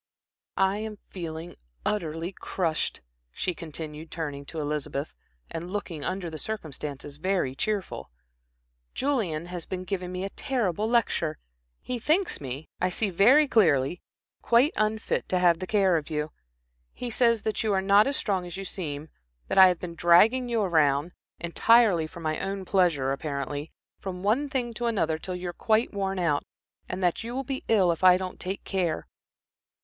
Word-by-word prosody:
"I 195 Hz, +1 st, +3 dB
am 215 Hz, -1 st, -5 dB
feeling 165 Hz, -2 st, -6 dB, 0.3 s
utterly 165 Hz, -3 st, -1 dB
crushed," 175 Hz, -4 st, -2 dB, 0.3 s
she 180 Hz, -, -2 dB
continued, 155 Hz, -1 st, -7 dB
turning 145 Hz, -4 st, -5 dB
to 160 Hz, -, -6 dB
Elizabeth, 150 Hz, -1 st, -3 dB, 0.4 s
and 165 Hz, +2 st, -5 dB
looking 180 Hz, -6 st, -4 dB
under 185 Hz, +1 st, -2 dB
the 160 Hz, -2 st, -6 dB
circumstances, 145 Hz, -8 st, -6 dB
very 180 Hz, -5 st, 0 dB
cheerful. 205 Hz, +5 st, -3 dB, 0.9 s
"Julian 210 Hz, -, 0 dB
has 175 Hz, -1 st, -6 dB
been 185 Hz, -1 st, -4 dB
giving 185 Hz, -1 st, -3 dB
me 180 Hz, +1 st, -3 dB
a 195 Hz, -, -4 dB
terrible 220 Hz, -5 st, -1 dB
lecture. 170 Hz, -9 st, +1 dB, 0.5 s
He 250 Hz, -1 st, -3 dB
thinks 335 Hz, -, +1 dB
me, 135 Hz, +3 st, -6 dB
I 180 Hz, -, +2 dB
see 200 Hz, +2 st, -1 dB
very 250 Hz, -, +6 dB
clearly, 170 Hz, -, +3 dB, 0.4 s
quite 245 Hz, +7 st, +4 dB
unfit 215 Hz, +1 st, 0 dB
to 185 Hz, -, +2 dB
have 175 Hz, -2 st, +4 dB
the 185 Hz, -, -4 dB
care 195 Hz, -4 st, +3 dB
of 150 Hz, -, -5 dB
you. 150 Hz, 0 st, -2 dB, 0.6 s
He 245 Hz, -1 st, -5 dB
says 230 Hz, -1 st, +3 dB
that 215 Hz, -2 st, -1 dB
you 220 Hz, -, +1 dB
are 195 Hz, -, +3 dB
not 200 Hz, +3 st, +5 dB
as 275 Hz, -, 0 dB
strong 195 Hz, -4 st, 0 dB
as 175 Hz, +1 st, -7 dB
you 195 Hz, -, -5 dB
seem, 155 Hz, -5 st, -5 dB, 0.4 s
that -, -, +3 dB
I 190 Hz, -, +11 dB
have 180 Hz, -1 st, +2 dB
been 175 Hz, -2 st, -6 dB
dragging 210 Hz, +10 st, +5 dB
you 230 Hz, -3 st, +1 dB
around 155 Hz, -3 st, +2 dB, 0.3 s
entirely 180 Hz, -1 st, +4 dB
for 170 Hz, +1 st, -11 dB
my 155 Hz, -1 st, -1 dB
own 195 Hz, -1 st, -3 dB
pleasure, 170 Hz, -9 st, +2 dB
apparently 145 Hz, +1 st, -3 dB, 0.3 s
from 185 Hz, -1 st, -6 dB
one 250 Hz, +8 st, +2 dB
thing 245 Hz, -3 st, -2 dB
to 240 Hz, +2 st, -2 dB
another 165 Hz, -9 st, 0 dB
till 185 Hz, +2 st, -5 dB
you 180 Hz, 0 st, -4 dB
are -, -, -6 dB
quite 220 Hz, +5 st, +1 dB
worn 195 Hz, -1 st, -1 dB
out, 165 Hz, -5 st, +1 dB, 0.5 s
and 185 Hz, +1 st, -3 dB
that 175 Hz, +4 st, +1 dB
you 235 Hz, +2 st, -5 dB
will 270 Hz, -, -1 dB
be 270 Hz, +1 st, -4 dB
ill 195 Hz, -6 st, +4 dB
if 165 Hz, -, -4 dB
I 180 Hz, -1 st, +8 dB
don't 185 Hz, -1 st, -6 dB
take 190 Hz, +2 st, -4 dB
care. 180 Hz, -5 st, -1 dB
185 Hz, 175 wpm, -27 LUFS, 160-215 Hz, 0.9 s, I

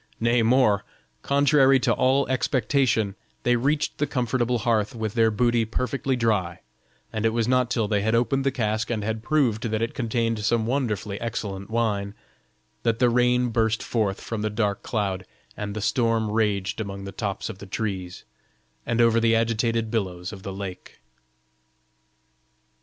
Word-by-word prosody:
Nay, 115 Hz, +1 st, +3 dB
more: 115 Hz, -4 st, +3 dB, 0.4 s
contrary 140 Hz, -1 st, +4 dB
to 120 Hz, -1 st, +2 dB
all 130 Hz, +2 st, +2 dB
expectation, 130 Hz, -5 st, +1 dB, 0.3 s
they 120 Hz, -, +3 dB
reached 140 Hz, +5 st, 0 dB
the 145 Hz, -, +1 dB
comfortable 125 Hz, -1 st, 0 dB
hearth 115 Hz, +1 st, 0 dB
with 110 Hz, -2 st, -3 dB
their 115 Hz, -2 st, +4 dB
booty 120 Hz, +1 st, +2 dB
perfectly 130 Hz, +4 st, -1 dB
dry, 105 Hz, -8 st, 0 dB, 0.5 s
and 110 Hz, -, -2 dB
it 115 Hz, -, +4 dB
was 115 Hz, 0 st, 0 dB
not 125 Hz, -1 st, +2 dB
till 115 Hz, -4 st, 0 dB
they 105 Hz, -1 st, +1 dB
had 110 Hz, +2 st, +1 dB
opened 135 Hz, +3 st, +1 dB
the 135 Hz, -, +2 dB
cask, 110 Hz, -3 st, -1 dB
and 110 Hz, -3 st, -2 dB
had 110 Hz, +1 st, -2 dB
proved 120 Hz, -5 st, +1 dB
that 110 Hz, 0 st, -1 dB
it 115 Hz, -, -2 dB
contained 115 Hz, -2 st, -1 dB
some 110 Hz, +1 st, +1 dB
wonderfully 110 Hz, -6 st, -2 dB
excellent 100 Hz, -4 st, -4 dB
wine, 105 Hz, -3 st, -1 dB, 0.7 s
that 115 Hz, -1 st, +1 dB
the 125 Hz, 0 st, +3 dB
rain 125 Hz, 0 st, +3 dB
burst 115 Hz, -1 st, +1 dB
forth 105 Hz, -5 st, -1 dB
from 115 Hz, -2 st, -4 dB
the 110 Hz, -, 0 dB
dark 105 Hz, -1 st, -1 dB
cloud, 100 Hz, -5 st, -2 dB, 0.3 s
and 105 Hz, -1 st, -5 dB
the 110 Hz, -, -3 dB
storm 115 Hz, -1 st, +1 dB
raged 105 Hz, -2 st, 0 dB
among 100 Hz, -2 st, -6 dB
the 100 Hz, -, -6 dB
tops 100 Hz, -1 st, -3 dB
of 105 Hz, -4 st, -7 dB
the 100 Hz, -, -9 dB
trees, 95 Hz, -3 st, -4 dB, 0.6 s
and 115 Hz, 0 st, +2 dB
over 115 Hz, 0 st, +4 dB
the 115 Hz, 0 st, +3 dB
agitated 115 Hz, 0 st, 0 dB
billows 95 Hz, -4 st, -3 dB
of 100 Hz, -, -9 dB
the 95 Hz, -, -6 dB
lake. 95 Hz, -1 st, -8 dB
115 Hz, 165 wpm, -25 LUFS, 105-120 Hz, 0.7 s, contrary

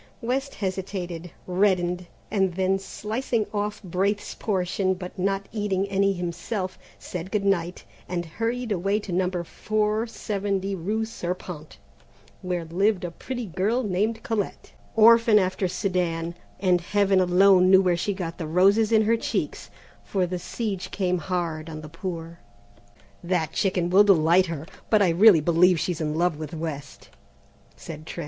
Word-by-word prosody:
West 265 Hz, +3 st, -2 dB
hesitated, 185 Hz, -3 st, -4 dB, 0.2 s
reddened, 180 Hz, -2 st, +1 dB, 0.2 s
and 190 Hz, -4 st, +1 dB
then 190 Hz, +1 st, +1 dB
slicing 220 Hz, +3 st, -2 dB
off 210 Hz, +1 st, -2 dB
Braith's 195 Hz, +3 st, -1 dB
portion, 190 Hz, -1 st, -1 dB
but 180 Hz, 0 st, -8 dB
not 195 Hz, +1 st, -1 dB
eating 200 Hz, -3 st, -1 dB
any 195 Hz, 0 st, +2 dB
himself, 185 Hz, +2 st, -4 dB, 0.2 s
said 180 Hz, 0 st, -6 dB
good 200 Hz, -1 st, -1 dB
night, 180 Hz, -3 st, 0 dB, 0.3 s
and 175 Hz, -1 st, -2 dB
hurried 230 Hz, +7 st, -3 dB
away 200 Hz, +2 st, +1 dB
to 205 Hz, -, -7 dB
number 180 Hz, 0 st, 0 dB
470 210 Hz, -1 st, -2 dB
rue 210 Hz, +5 st, -1 dB
Serpente, 180 Hz, -7 st, -6 dB, 0.6 s
where 180 Hz, -3 st, -3 dB
lived 190 Hz, +4 st, +1 dB
a 175 Hz, -, -3 dB
pretty 245 Hz, +6 st, -5 dB
girl 205 Hz, +7 st, 0 dB
named 215 Hz, +3 st, -1 dB
Colette, 220 Hz, -4 st, -3 dB, 0.2 s
orphan 230 Hz, 0 st, +7 dB
after 185 Hz, -1 st, +1 dB
Sedan, 175 Hz, -2 st, -1 dB, 0.3 s
and 180 Hz, -2 st, +2 dB
Heaven 195 Hz, +1 st, +2 dB
alone 185 Hz, +1 st, +5 dB
knew 190 Hz, 0 st, +7 dB
where 180 Hz, -2 st, +3 dB
she 195 Hz, +3 st, -2 dB
got 170 Hz, -3 st, -5 dB
the 160 Hz, -, -3 dB
roses 200 Hz, +7 st, +4 dB
in 220 Hz, -1 st, +5 dB
her 225 Hz, +2 st, +3 dB
cheeks, -, -, -3 dB, 0.3 s
for 190 Hz, -2 st, 0 dB
the 180 Hz, 0 st, -4 dB
siege 200 Hz, 0 st, -4 dB
came 180 Hz, -2 st, 0 dB
hard 165 Hz, -2 st, -3 dB
on 155 Hz, -1 st, -7 dB
the 155 Hz, -, -9 dB
poor. 170 Hz, 0 st, -6 dB, 0.8 s
"That 175 Hz, -3 st, -1 dB
chicken 180 Hz, -3 st, 0 dB
will 195 Hz, +3 st, +7 dB
delight 180 Hz, -1 st, +4 dB
her, 160 Hz, -2 st, -5 dB, 0.2 s
but 215 Hz, -2 st, +5 dB
I 185 Hz, -, +3 dB
really 180 Hz, 0 st, +6 dB
believe 170 Hz, +2 st, +4 dB
she's 170 Hz, -1 st, -2 dB
in 150 Hz, -1 st, -1 dB
love 170 Hz, -1 st, +1 dB
with 155 Hz, +1 st, -6 dB
West," 150 Hz, -3 st, -6 dB, 0.7 s
said 155 Hz, -1 st, -9 dB
Trent. -, -, -7 dB
185 Hz, 150 wpm, -25 LUFS, 175-205 Hz, 0.8 s, orphan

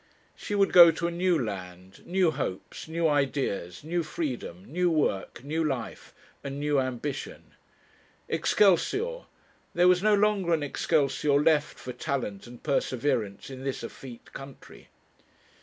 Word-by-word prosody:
She 205 Hz, -, -4 dB
would 195 Hz, -1 st, +2 dB
go 175 Hz, -2 st, +10 dB
to 165 Hz, +1 st, -2 dB
a -, -, -2 dB
new 175 Hz, 0 st, +1 dB
land, 95 Hz, -, -6 dB
new 180 Hz, -2 st, +2 dB
hopes, 135 Hz, -7 st, -5 dB
new 165 Hz, +1 st, 0 dB
ideas, 135 Hz, -, -1 dB
new 170 Hz, +3 st, -1 dB
freedom, 130 Hz, -, -5 dB
new 175 Hz, +5 st, 0 dB
work, 140 Hz, -, -1 dB
new 160 Hz, +3 st, -1 dB
life, 135 Hz, -7 st, -4 dB, 0.3 s
and 140 Hz, 0 st, -5 dB
new 145 Hz, -1 st, +1 dB
ambition. 130 Hz, +2 st, -5 dB, 0.7 s
'Excelsior!' 405 Hz, -, +2 dB, 0.5 s
there 175 Hz, +1 st, +5 dB
was 180 Hz, 0 st, +5 dB
no 210 Hz, 0 st, +4 dB
longer 200 Hz, -4 st, +2 dB
an 155 Hz, -, -3 dB
excelsior 145 Hz, 0 st, +1 dB
left 150 Hz, -1 st, +2 dB
for 125 Hz, -, -7 dB
talent 120 Hz, -8 st, -4 dB
and 120 Hz, 0 st, -13 dB
perseverance 130 Hz, -5 st, -1 dB
in 130 Hz, 0 st, -8 dB
this 135 Hz, -3 st, -3 dB
effete 120 Hz, 0 st, -10 dB
country. 135 Hz, 0 st, -11 dB
145 Hz, 140 wpm, -27 LUFS, 125-170 Hz, 0.7 s, go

